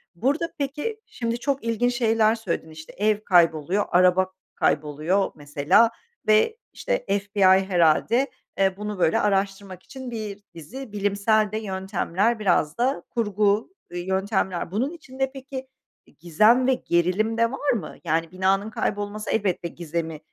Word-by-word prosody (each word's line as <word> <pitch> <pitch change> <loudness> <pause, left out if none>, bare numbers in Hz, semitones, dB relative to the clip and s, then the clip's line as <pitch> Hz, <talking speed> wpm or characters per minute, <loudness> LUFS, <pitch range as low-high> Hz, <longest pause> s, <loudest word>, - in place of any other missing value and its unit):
Burada 290 - -1
peki, 295 +10 -3
şimdi 230 0 -3
çok 275 +1 -1
ilginç 230 +2 0
şeyler 225 -2 +3
söyledin, 185 -7 -4
işte, 160 0 -11
ev 210 +1 +2
kayboluyor, 170 +1 +3
araba 185 +1 +4 0.2
kayboluyor 155 +6 0
mesela 145 +9 +3 0.4
ve, 215 - +4 0.2
işte, - - -2
FBI 200 +1 -2 0.2
herhâlde, 190 - +2 0.3
eee, 195 -1 +2
bunu, 210 -1 -5
böyle, 165 -2 +3
araştırmak 195 -2 -1
için 260 -2 -9
bir 215 -3 -5
dizi 230 - -9
bilimsel 205 +1 +1
de 215 - -2
yöntemler 195 +1 -1
biraz 175 -6 +1
da 260 +4 0
kurgu, 210 -2 +1 0.2
ııı, 175 - -4
yöntemler. 190 -1 -1
Bunun 245 +9 -1
içinde 270 -5 -4
peki, 265 -1 -7 0.4
i - - -25
gizem 215 - +4
ve 265 - +4
gerilim 190 +2 0
de 230 0 +2
var 280 +2 0
mı? 205 -10 -3
Yani, 165 0 -1
binanın 190 +3 +1
kaybolması 205 0 -3
elbette 190 -5 0
gizemi 165 -1 -5
205 Hz, 140 wpm, -24 LUFS, 180-230 Hz, 0.4 s, araba